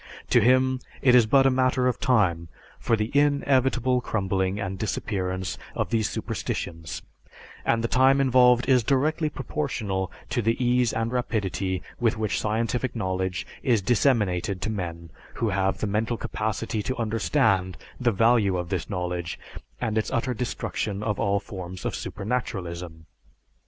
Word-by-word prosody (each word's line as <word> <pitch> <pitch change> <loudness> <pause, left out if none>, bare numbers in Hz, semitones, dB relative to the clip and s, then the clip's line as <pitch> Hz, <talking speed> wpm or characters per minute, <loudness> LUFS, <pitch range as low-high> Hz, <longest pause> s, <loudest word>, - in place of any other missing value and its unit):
To 120 - +6
him 130 +2 +3 0.2
it 125 - +6
is 120 -3 +6
but 135 +3 +5
a 135 - +5
matter 130 0 +2
of 125 - +1
time 95 -10 +2 0.3
for 115 - +2
the 110 +5 -3
inevitable 135 -3 +2
crumbling 95 -3 -1
and 95 -2 -4
disappearance 95 -3 -2 0.2
of - - -2
these 110 -2 +1
superstitions, 80 -1 -4 0.6
and 115 0 +1
the - - +1
time 130 +3 +4
involved 125 -2 +5
is 130 -2 +5
directly 150 +5 +1
proportional 120 - -3 0.2
to 120 - 0
the 115 +1 +1
ease 125 -1 +2
and 115 +1 -1
rapidity 100 -6 -1 0.2
with 115 -1 +1
which 110 -1 -1
scientific 115 +3 -1
knowledge 95 -3 -2 0.2
is 120 -8 +2
disseminated 100 -6 +1
to 110 - -1
men 85 -5 -5 0.2
who 115 - 0
have 95 0 0
the - - -2
mental 110 +3 -1
capacity 110 +1 -2
to 130 +5 -3
understand 110 - +1 0.2
the 125 -2 +2
value 110 -3 +3
of 90 -1 -4
this 95 -4 -3
knowledge 90 -3 -3 0.4
and 110 -1 0
its 110 - -2
utter 125 +2 -1
destruction 105 -3 -3
of 105 -2 -1
all 100 0 +2
forms 95 -3 -8
of - - -1
supernaturalism. 90 -8 -4
110 Hz, 150 wpm, -25 LUFS, 95-125 Hz, 0.6 s, To